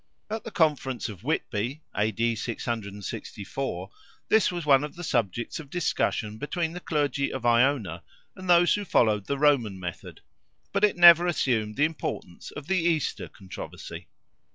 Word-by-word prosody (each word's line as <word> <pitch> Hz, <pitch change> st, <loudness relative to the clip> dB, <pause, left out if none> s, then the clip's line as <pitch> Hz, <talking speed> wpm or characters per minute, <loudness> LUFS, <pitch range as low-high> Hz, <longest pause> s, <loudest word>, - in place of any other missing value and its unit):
At 220 Hz, 0 st, -3 dB
the -, -, -6 dB
conference 145 Hz, -, 0 dB
of 100 Hz, -5 st, -10 dB
Whitby 125 Hz, +9 st, -2 dB
(A.D. 110 Hz, +2 st, +1 dB
664) 100 Hz, -2 st, -5 dB, 0.4 s
this 220 Hz, -3 st, +4 dB
was 175 Hz, -3 st, -4 dB
one 140 Hz, -1 st, +5 dB
of 150 Hz, -, -6 dB
the 175 Hz, -, -8 dB
subjects 115 Hz, -, -1 dB
of 150 Hz, -3 st, -10 dB
discussion 110 Hz, -10 st, -1 dB
between 165 Hz, +3 st, -2 dB
the 180 Hz, -, -5 dB
clergy 145 Hz, -4 st, -1 dB
of 130 Hz, -2 st, -5 dB
Iona, 120 Hz, -7 st, +2 dB, 0.3 s
and 185 Hz, -1 st, -8 dB
those 175 Hz, 0 st, +6 dB
who 205 Hz, -, -1 dB
followed 105 Hz, -, +2 dB
the 140 Hz, -, -1 dB
Roman 130 Hz, -9 st, +2 dB
method—but 95 Hz, -, -8 dB
it 210 Hz, -4 st, +4 dB
never 175 Hz, 0 st, +9 dB
assumed 115 Hz, -10 st, 0 dB
the 145 Hz, -, +3 dB
importance 150 Hz, -, -5 dB
of 140 Hz, -, -9 dB
the 190 Hz, +3 st, +1 dB
Easter 165 Hz, -2 st, 0 dB
controversy. 95 Hz, -3 st, -9 dB
135 Hz, 150 wpm, -27 LUFS, 110-170 Hz, 0.4 s, never